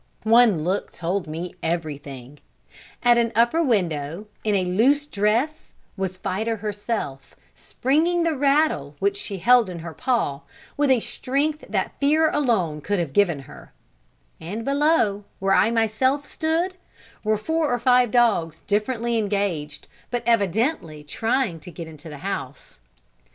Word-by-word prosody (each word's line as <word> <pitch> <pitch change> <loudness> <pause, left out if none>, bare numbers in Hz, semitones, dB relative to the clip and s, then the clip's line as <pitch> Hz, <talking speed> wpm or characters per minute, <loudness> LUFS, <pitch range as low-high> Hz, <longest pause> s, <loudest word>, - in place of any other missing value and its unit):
One 220 -7 +5
look 185 +4 -1
told 180 +2 -3
me 165 +3 -5
everything: 145 -5 -4 0.6
at 240 -1 +5
an 230 -1 +1
upper 235 +8 +3
window, 175 - -1 0.2
in 210 -2 +1
a 185 -2 +1
loose 255 +11 +2
dress, 235 +7 -1 0.2
was 190 -2 -3
Fida 220 +5 -2
herself, 205 - -4 0.2
springing 330 +6 0
the 330 -2 +1
rattle 275 - +1
which 200 +3 0
she 200 0 -5
held 235 +2 +4
in 180 - -6
her 165 0 -7
paw, 195 - -1 0.3
with 290 -1 +1
a 260 -2 +5
strength 285 +6 -2
that - - -2
fear 310 +3 +3
alone 195 - 0
could 205 +6 -1
have 165 -6 -2
given 175 -8 +2
her; 135 - -14 0.7
and 210 +8 -6
below, 275 -8 +2
where 195 0 +1
I 210 - +4
myself 235 +5 +1
stood, 330 +4 -1 0.5
were 215 0 +1
four 320 +6 0
or 245 - +2
five 250 0 +4
dogs 185 -10 +2
differently 230 +2 0
engaged, 195 -8 -2 0.2
but 240 -1 -2
evidently 210 - 0
trying 225 - -1
to 155 - -11
get 165 -1 -8
into 160 +1 -11
the 150 - -8
house. 140 - -6
210 Hz, 145 wpm, -23 LUFS, 170-255 Hz, 0.7 s, One